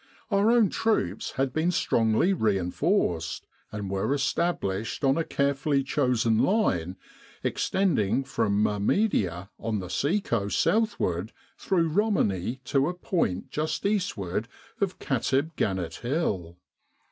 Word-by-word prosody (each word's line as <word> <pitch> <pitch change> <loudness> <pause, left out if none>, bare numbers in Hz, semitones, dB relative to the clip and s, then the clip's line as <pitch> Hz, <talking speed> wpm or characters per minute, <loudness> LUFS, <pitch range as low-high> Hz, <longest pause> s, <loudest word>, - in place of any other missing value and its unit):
Our 200 +2 +3
own 230 -4 +5
troops 215 - 0
had 135 -1 -1
been 160 +2 +1
strongly 115 - +2
reinforced, 95 - 0 0.3
and 105 -2 -4
were 95 +8 0
established 125 - -1
on 135 0 +4
a 165 - +1
care 140 -2 +1
fully 140 0 0
chosen 125 -5 +1
line 95 - +1 0.5
extending 135 - +1
from 110 -6 0
Mahemdia 100 - 0
on 110 -1 -2
the 90 -3 -5
sea 165 +9 +1
coast 105 - -1
southward 110 - 0 0.2
through 170 -4 +1
Romani 135 - 0
to 135 +3 +1
a 180 - -4
point 170 - -1
just 155 +4 -2
eastward 115 - -1 0.3
of 195 -2 -1
Katib 140 +4 0
Gannit 95 -4 -1
Hill. 105 - -2
130 Hz, 125 wpm, -27 LUFS, -, 0.5 s, own